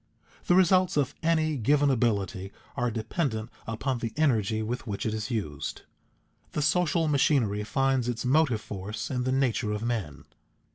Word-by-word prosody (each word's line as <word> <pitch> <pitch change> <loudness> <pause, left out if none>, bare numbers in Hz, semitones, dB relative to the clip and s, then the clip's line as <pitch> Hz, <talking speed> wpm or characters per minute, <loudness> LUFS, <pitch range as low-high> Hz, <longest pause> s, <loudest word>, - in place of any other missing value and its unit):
_ - - -27
The 175 - +5
results 185 -2 +4
of 140 -3 +1
any 160 -2 +1
given 140 +4 +3
ability 100 -5 0 0.2
are 125 0 0
dependent 115 - -2 0.2
upon 120 +3 -2
the 115 -2 -4
energy 110 -8 +2
with 120 +2 -4
which 100 -2 -3
it 110 - 0
is 110 +2 -3
used. 100 - -4 0.7
The 150 - 0
social 165 +1 +2
machinery 135 -8 +2
finds 135 +1 +1
its 120 +1 -3
motive 130 -4 +3
force 105 +4 -5
in 125 -1 -1
the 130 - +1
nature 130 -4 +1
of 105 +1 -3
men. 110 - -3
120 Hz, 160 wpm, -28 LUFS, 110-145 Hz, 0.7 s, The